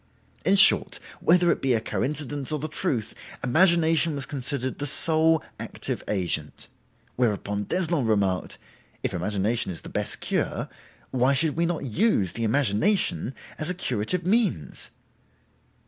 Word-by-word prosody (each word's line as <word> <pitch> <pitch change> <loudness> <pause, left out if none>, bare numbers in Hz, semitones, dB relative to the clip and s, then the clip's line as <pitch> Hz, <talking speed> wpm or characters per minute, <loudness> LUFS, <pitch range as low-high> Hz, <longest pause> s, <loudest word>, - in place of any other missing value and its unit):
In 190 +5 +4
short—whether 180 -2 +4
it - - -2
be 135 -2 +2
a - - +1
coincidence 145 +3 -2
or 155 - 0
the 150 +2 -4
truth—imagination 160 - +1
was 140 -1 -2
considered 135 -1 -4
the 145 - -2
sole 160 +2 +3 0.2
active - - -5
agent. 85 -6 -2 0.5
Whereupon 105 -3 -1
d'Eslon 170 - 0
remarked, 100 -4 0 0.5
'If - - -1
imagination 105 +4 -1
is 85 - -8
the - - -10
best - - -3
cure, - - -2 0.4
why 130 +2 +2
should 150 +2 +1
we 170 +1 +1
not 170 -4 -3
use 125 - +1
the 115 - -5
imagination 130 - +1 0.2
as 155 - -1
a 180 - -2
curative 165 - -2
means? 195 - 0
140 Hz, 130 wpm, -25 LUFS, 110-165 Hz, 0.5 s, In